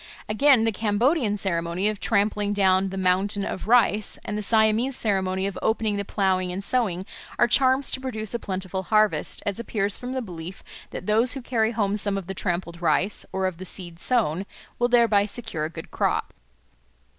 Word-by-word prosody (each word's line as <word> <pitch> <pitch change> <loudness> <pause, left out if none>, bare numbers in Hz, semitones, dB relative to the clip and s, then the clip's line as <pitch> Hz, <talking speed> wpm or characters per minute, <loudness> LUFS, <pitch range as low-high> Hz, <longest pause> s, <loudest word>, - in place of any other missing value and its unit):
Again, 250 +2 +4
the 225 - +2
Cambodian 220 +2 +1
ceremony 170 0 -1
of 215 -2 -2
trampling 205 -1 +1
down 190 -1 +3
the 195 - -6
"mountain 190 +2 +1
of 190 - -5
rice," 220 -3 +3
and 210 - -3
the 210 - -2
Siamese 220 +4 +3
ceremony 190 -4 0
of 200 -2 -4
opening 220 -1 0
the 200 - -2
ploughing 190 -2 0
and 190 +2 -5
sowing, 195 -6 0 0.3
are - - +5
charms 260 +2 +3
to 260 - -1
produce 220 -5 -4
a 235 - -1
plentiful 190 -2 -4
harvest, 215 +2 +1
as 205 +1 -2
appears 205 -4 -2
from 250 +1 -5
the 260 - -2
belief 175 -2 -8 0.3
that - - -7
those 225 +5 +2
who 270 - -5
carry 230 -2 0
home 205 -3 0
some 205 -1 0
of 195 - -5
the 190 - -5
trampled 175 -2 -3
rice, 175 +5 0
or 190 0 -1
of 185 -3 -2
the - - -6
seed 175 -2 -7
sown, 195 -6 0 0.3
will 240 - +3
thereby 230 -4 +4
secure 210 -8 -4
a - - -3
good 165 - -10
crop. - - -1
205 Hz, 190 wpm, -25 LUFS, 190-225 Hz, 0.3 s, are